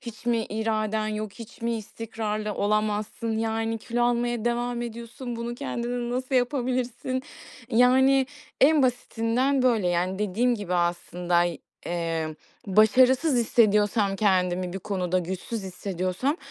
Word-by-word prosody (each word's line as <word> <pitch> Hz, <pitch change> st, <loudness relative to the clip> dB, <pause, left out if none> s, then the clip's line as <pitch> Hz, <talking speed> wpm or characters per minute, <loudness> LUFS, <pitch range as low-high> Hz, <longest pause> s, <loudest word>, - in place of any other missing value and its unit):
Hiç 235 Hz, -1 st, -10 dB
mi 235 Hz, -1 st, +3 dB
iraden 215 Hz, 0 st, -1 dB
yok? 215 Hz, -1 st, -4 dB
Hiç 230 Hz, 0 st, -12 dB
mi 235 Hz, 0 st, 0 dB
istikrarlı 215 Hz, -1 st, -4 dB
olamazsın? 215 Hz, +2 st, -1 dB
Yani, 225 Hz, 0 st, -1 dB
kilo 240 Hz, +2 st, -1 dB
almaya 240 Hz, -1 st, 0 dB
devam 240 Hz, 0 st, -1 dB
ediyorsun. 235 Hz, +1 st, -6 dB
Bunu 235 Hz, +1 st, -4 dB
kendine 240 Hz, 0 st, -3 dB
nasıl 260 Hz, +1 st, -2 dB
yapabilirsin?" 255 Hz, 0 st, -1 dB, 0.5 s
Yani, 260 Hz, +3 st, +5 dB, 0.3 s
en 295 Hz, +1 st, +6 dB
basitinden 250 Hz, +2 st, +1 dB
böyle. 230 Hz, -7 st, +3 dB
Yani, 180 Hz, +2 st, 0 dB
dediğim 220 Hz, +5 st, +1 dB
gibi 195 Hz, -5 st, -3 dB
aslında 175 Hz, 0 st, +1 dB
y 175 Hz, -1 st, -2 dB, 0.3 s
eee, 165 Hz, -2 st, -2 dB, 0.3 s
başarısız 255 Hz, -, +4 dB
hissediyorsam 210 Hz, -3 st, +3 dB
kendimi 185 Hz, -3 st, +1 dB
bir 190 Hz, -, -4 dB
konuda, 185 Hz, -2 st, -1 dB
güçsüz 190 Hz, +5 st, -4 dB
hissediyorsam 185 Hz, -, -2 dB
225 Hz, 125 wpm, -26 LUFS, 195-240 Hz, 0.5 s, en